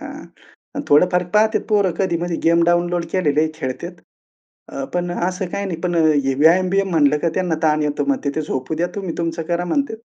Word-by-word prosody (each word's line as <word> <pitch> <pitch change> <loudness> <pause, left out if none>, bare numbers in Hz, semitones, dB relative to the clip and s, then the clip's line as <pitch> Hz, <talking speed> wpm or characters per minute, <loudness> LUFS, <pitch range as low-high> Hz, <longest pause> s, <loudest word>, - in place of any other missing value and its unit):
हां - - -8 0.5
आणि - - -4
थोडंफार 180 +5 +4
पाहतात 220 +1 +3
पोरं. 205 -3 +2
कधी-मध्ये 175 -2 -1
गेम 170 +1 +4
डाउनलोड 175 0 +1
केलेलेही 155 -3 +1
खेळतात. 165 +5 -6 0.7
अ, 135 - -5
पण 175 0 -1
असं 180 +2 -2
काही 200 - -2
नाही. 165 -3 -5
पण 180 -1 -2
हे 150 -5 +2
व्यायाम-बियाम 185 +6 +3
म्हणलं, 150 -3 +3
की 170 - 0
त्यांना 180 -3 0
ताण 155 -1 +2
येतो. 145 -1 -1
म्हणते 260 - 0
ते 155 - 0
झोपू 130 +1 -3
द्या, 170 +3 0
तुम्ही 190 -5 -4
तुमचं 165 0 -2
करा 175 0 0
म्हणते. 250 +5 -1
175 Hz, 185 wpm, -20 LUFS, 155-185 Hz, 0.7 s, थोडंफार